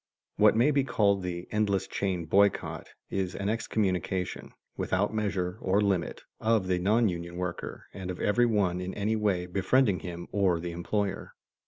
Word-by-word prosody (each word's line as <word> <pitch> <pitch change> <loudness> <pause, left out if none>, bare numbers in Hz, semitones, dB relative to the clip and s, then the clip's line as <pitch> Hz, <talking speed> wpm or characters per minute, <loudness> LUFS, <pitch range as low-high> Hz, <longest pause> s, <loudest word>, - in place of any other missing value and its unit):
What - - +6
may 125 +7 +4
be 140 -1 +2
called 100 -6 +2
the 90 -1 -4
endless 105 -3 +1
chain 95 -4 -2
boycott 100 +4 +2 0.2
is 95 -1 -2
an 100 0 -2
excommunication, 95 -5 -1 0.2
without 100 +3 0
measure 100 -3 -1
or 95 +2 +2
limit, 95 -5 0 0.2
of 110 -3 +2
the 90 -1 +1
non 110 +5 +3
union 85 -2 -4
worker 90 -1 -5
and 95 -2 -6
of 90 - -5
every 120 +4 +3
one 95 -5 +1
in 90 +1 -5
any 105 +2 0
way 100 -5 0
befriending 95 +3 +2
him 85 +1 -7
or 95 -4 +2
the 85 +1 -4
employer. 95 +3 -3
95 Hz, 165 wpm, -29 LUFS, 90-105 Hz, 0.2 s, What